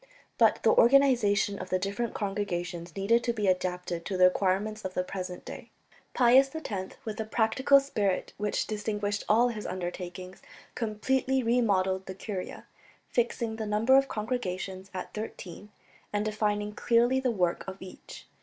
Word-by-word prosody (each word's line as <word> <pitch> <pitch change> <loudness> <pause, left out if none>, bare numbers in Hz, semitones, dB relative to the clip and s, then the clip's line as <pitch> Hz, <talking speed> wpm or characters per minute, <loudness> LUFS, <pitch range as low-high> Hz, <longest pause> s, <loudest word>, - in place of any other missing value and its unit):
But - - +4
the - - +5
organization 235 -6 +4
of 185 - -7
the 185 - +2
different 200 +5 -3
congregations 175 -4 -3
needed 230 +5 +2
to 235 - 0
be 215 -3 -2
adapted 180 -2 -1
to 190 - -2
the 185 - +4
requirements 195 +3 +2
of 185 0 -5
the 180 - +1
present 180 -1 -6
day. - - -9 0.5
Pius 260 +2 +6
X, 200 -12 -5
with 215 -2 -4
the 220 - -2
practical 225 +6 +3
spirit 210 -9 -1
which 210 0 -1
distinguished 210 -1 -2
all 235 +3 +5
his 215 -3 -5
undertakings, 180 0 -6 0.3
completely 260 +4 0
remodelled 195 -6 +1
the 190 - -6
curia, 195 -1 -6 0.4
fixing 235 -2 -1
the 220 -1 -4
number 215 +5 +3
of 275 0 +5
congregations 195 -5 -4
at 185 -1 -6
thirteen, 210 -2 -7 0.4
and 210 0 -1
defining 210 -1 -1
clearly 240 +4 +2
the 260 -1 0
work 180 -6 0
of 190 0 -6
each. 190 -1 -11
210 Hz, 155 wpm, -28 LUFS, 185-230 Hz, 0.5 s, Pius